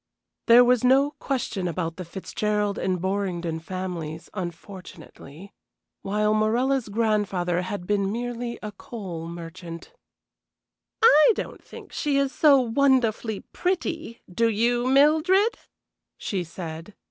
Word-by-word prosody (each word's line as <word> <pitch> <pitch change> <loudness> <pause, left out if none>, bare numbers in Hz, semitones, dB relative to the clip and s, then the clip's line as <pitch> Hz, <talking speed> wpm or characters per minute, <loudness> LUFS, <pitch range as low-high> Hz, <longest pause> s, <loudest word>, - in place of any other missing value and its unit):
There 240 +1 +8
was 250 -1 +3
no 270 +3 +4
question 240 -11 -3
about 165 -1 -3
the 180 - -6
Fitzgerald 205 +3 -2
and 185 -1 -1
Borringdon 180 -3 -2
families, 170 -3 -6
unfortunately, 185 -2 -9 0.5
while 210 +2 +1
Morella's 235 +3 +1
grandfather 200 -5 0
had 185 0 -5
been 200 0 0
merely 240 +1 -4
a 210 - -5
coal 190 -6 -7
merchant. 170 - -9 1.1
"I 310 -1 +7
don't - - -6
think - - -12
she 290 -2 0
is 275 -1 +1
so 285 -3 +5
wonderfully 240 -4 +1
pretty, 335 -8 -3
do 230 +6 +1
you, 240 +3 +1
Mildred?" 315 - +4 0.6
she 190 -3 -3
said. 165 +2 -8
210 Hz, 115 wpm, -25 LUFS, 180-250 Hz, 1.1 s, There